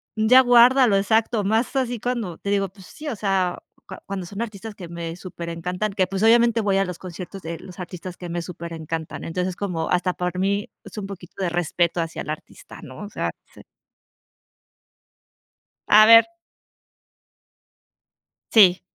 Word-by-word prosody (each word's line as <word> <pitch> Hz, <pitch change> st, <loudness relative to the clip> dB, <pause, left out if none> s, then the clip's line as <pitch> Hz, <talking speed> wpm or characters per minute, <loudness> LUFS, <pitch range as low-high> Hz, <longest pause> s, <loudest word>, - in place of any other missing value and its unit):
¡ya 225 Hz, +4 st, +6 dB
guárdalo!", 245 Hz, -2 st, +6 dB
exacto, 220 Hz, +2 st, +1 dB
más 220 Hz, +7 st, 0 dB
así 245 Hz, -3 st, -1 dB
cuando 230 Hz, -8 st, -3 dB
te 200 Hz, -, -6 dB
digo, 195 Hz, -1 st, +1 dB
pues 190 Hz, 0 st, -16 dB
sí, 305 Hz, +9 st, -10 dB
o 275 Hz, -, -2 dB
sea, 195 Hz, -3 st, 0 dB, 0.3 s
cu -, -, -8 dB
cuando 195 Hz, -2 st, -5 dB
son 200 Hz, +4 st, -6 dB
artistas 215 Hz, -1 st, -8 dB
que 180 Hz, -3 st, -9 dB
me 170 Hz, -1 st, -5 dB
superencantan, 180 Hz, +3 st, -5 dB
que, 190 Hz, -1 st, +2 dB
pues, 195 Hz, +1 st, -4 dB
obviamente, 235 Hz, 0 st, +5 dB
voy 200 Hz, -2 st, +1 dB
a 195 Hz, -, +2 dB
los 180 Hz, -2 st, -6 dB
conciertos 185 Hz, +1 st, -8 dB
de 165 Hz, 0 st, -5 dB
los 180 Hz, -2 st, -12 dB
artistas 180 Hz, 0 st, -7 dB
que 175 Hz, -, -8 dB
me 175 Hz, 0 st, -3 dB
superencantan. 165 Hz, -2 st, -6 dB
Entonces, 180 Hz, +2 st, -2 dB
como 175 Hz, -5 st, -3 dB
hasta 180 Hz, 0 st, +1 dB
por 180 Hz, 0 st, -3 dB
mí, 200 Hz, +2 st, 0 dB, 0.2 s
es -, -, -12 dB
un 195 Hz, -, -5 dB
poquito 185 Hz, -3 st, -10 dB
de 185 Hz, -, 0 dB
respeto 175 Hz, 0 st, 0 dB
hacia 165 Hz, 0 st, -3 dB
el -, -, -8 dB
artista, 155 Hz, -, -8 dB
¿no? 130 Hz, -5 st, -11 dB
O -, -, -9 dB
sea, -, -, -3 dB, 0.2 s
sí. -, -, -13 dB, 2.3 s
A 215 Hz, +1 st, +8 dB
ver 230 Hz, +3 st, +8 dB, 2.2 s
Sí. 190 Hz, -5 st, +6 dB
190 Hz, 165 wpm, -23 LUFS, 175-215 Hz, 2.3 s, A